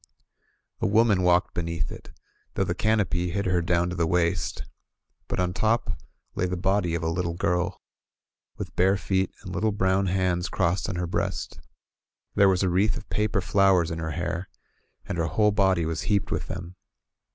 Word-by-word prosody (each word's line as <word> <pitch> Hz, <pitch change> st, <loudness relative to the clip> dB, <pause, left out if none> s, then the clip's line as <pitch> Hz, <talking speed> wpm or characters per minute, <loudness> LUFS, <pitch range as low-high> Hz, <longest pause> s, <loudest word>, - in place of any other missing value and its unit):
A -, -, +1 dB
woman 110 Hz, -2 st, +4 dB
walked 90 Hz, 0 st, +3 dB
beneath 85 Hz, -1 st, -3 dB
it, -, -, -10 dB, 0.5 s
though -, -, +2 dB
the -, -, -1 dB
canopy 100 Hz, -5 st, +1 dB
hid 100 Hz, +3 st, -2 dB
her 90 Hz, -2 st, +2 dB
down 85 Hz, +1 st, +1 dB
to -, -, -4 dB
the 85 Hz, -2 st, +1 dB
waist; 85 Hz, 0 st, 0 dB, 0.6 s
but -, -, -3 dB
on 90 Hz, 0 st, 0 dB
top 115 Hz, +4 st, +1 dB, 0.4 s
lay 90 Hz, -, 0 dB
the 90 Hz, 0 st, -2 dB
body 90 Hz, -1 st, +1 dB
of 85 Hz, -, -3 dB
a -, -, 0 dB
little 85 Hz, 0 st, -1 dB
girl, 90 Hz, +1 st, 0 dB, 0.8 s
with -, -, -6 dB
bare 95 Hz, +2 st, +3 dB
feet 95 Hz, -1 st, 0 dB
and 95 Hz, -2 st, -7 dB
little 110 Hz, +2 st, +1 dB
brown 95 Hz, -1 st, +1 dB
hands 90 Hz, -1 st, 0 dB
crossed 85 Hz, +3 st, 0 dB
on 100 Hz, -, -3 dB
her 90 Hz, 0 st, -1 dB
breast. 85 Hz, -, -3 dB, 0.7 s
There 100 Hz, -1 st, +5 dB
was 95 Hz, 0 st, +2 dB
a 95 Hz, -, +2 dB
wreath 100 Hz, +6 st, +2 dB
of 110 Hz, -, -11 dB
paper 105 Hz, -1 st, +1 dB
flowers 95 Hz, -3 st, +3 dB
in 80 Hz, -, -3 dB
her 80 Hz, -1 st, -3 dB
hair, 85 Hz, +1 st, -3 dB, 0.6 s
and 85 Hz, -, -4 dB
her 85 Hz, -, +1 dB
whole 105 Hz, +2 st, +3 dB
body 95 Hz, -5 st, +2 dB
was 80 Hz, 0 st, -2 dB
heaped 100 Hz, -1 st, +1 dB
with -, -, -2 dB
them. 90 Hz, +1 st, -7 dB
90 Hz, 185 wpm, -26 LUFS, 85-100 Hz, 0.8 s, There